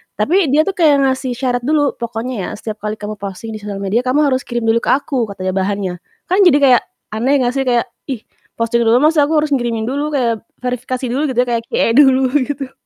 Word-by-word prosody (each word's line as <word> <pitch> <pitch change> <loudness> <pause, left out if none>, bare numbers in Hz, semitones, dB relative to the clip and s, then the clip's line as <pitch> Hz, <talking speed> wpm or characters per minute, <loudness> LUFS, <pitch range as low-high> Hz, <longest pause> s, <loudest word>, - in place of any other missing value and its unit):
tapi 330 - +2
dia 290 +3 +3
tuh 395 - -1
kayak 305 -7 +3
ngasih 260 -1 -1
syarat 250 -1 -1
dulu, 295 -2 +1
"Pokoknya 235 +2 -4
ya 185 - -3
setiap 215 0 -7
kali 210 0 -3
kamu 210 0 -7
posting 200 +3 -6
di 215 - -6
sosial 205 -1 -6
media 200 +4 +1
kamu 285 +4 +3
harus 260 0 -1
kirim 240 -1 -3
dulu 225 +1 +2
ke - - -8
aku," 265 -4 -2
katanya 185 -2 -4
bahannya. 190 -1 -2 0.4
Kan 380 0 +5
jadi 295 -5 +5
kayak 255 -3 +6 0.3
aneh 255 +5 +1
gak 245 - +1
sih 270 - -1
kayak, 240 0 +1 0.2
ih 255 -5 -5 0.3
posting 235 +1 0
dulu 235 +3 +4
maksudnya 305 -1 +4
aku 320 - 0
harus 305 - -2
ngirimin 240 -4 0
dulu 290 +3 -2
kayak 240 -5 +1 0.3
verifikasi 250 +1 -3
dulu 265 +5 -1
gitu 245 - +3
kayak 230 -1 -1
QA - - +1
dulu 265 -2 +5 0.2
gitu. 275 -1 -5
250 Hz, 220 wpm, -17 LUFS, 225-275 Hz, 0.4 s, kayak